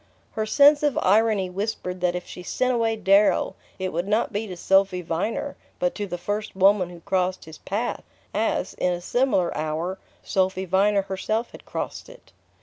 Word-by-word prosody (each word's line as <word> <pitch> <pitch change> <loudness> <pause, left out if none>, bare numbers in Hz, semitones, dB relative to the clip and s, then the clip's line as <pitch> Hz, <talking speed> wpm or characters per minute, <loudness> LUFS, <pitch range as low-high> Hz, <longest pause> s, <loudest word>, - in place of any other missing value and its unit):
Her 220 -1 -2
sense 290 +4 +6
of 295 -3 +1
irony 210 -1 +3
whispered 180 -1 -4
that 180 -1 +1
if 180 - -4
she - - -9
sent 255 +7 0
away 225 -2 +1
Darrow 200 0 +3 0.2
it 185 -1 -3
would 175 +3 -2
not 215 +2 +1
be 215 +2 -2
to 180 -3 -7
Sophy 190 0 +2
Viner, 215 - -2 0.2
but 180 0 0
to 205 - -4
the 180 - -4
first 205 +4 -4
woman 190 -1 +4
who 175 -1 -12
crossed 185 0 -1
his 160 -1 -11
path 225 +5 -3 0.3
as, - - 0
in 180 - 0
a 175 - -3
similar 240 -3 +1
hour, 155 +5 -2 0.2
Sophy 190 0 0
Viner 195 +2 +3
herself 215 +5 -2
had - - -13
crossed - - -5
it... - - -16
195 Hz, 180 wpm, -24 LUFS, 180-220 Hz, 0.3 s, sense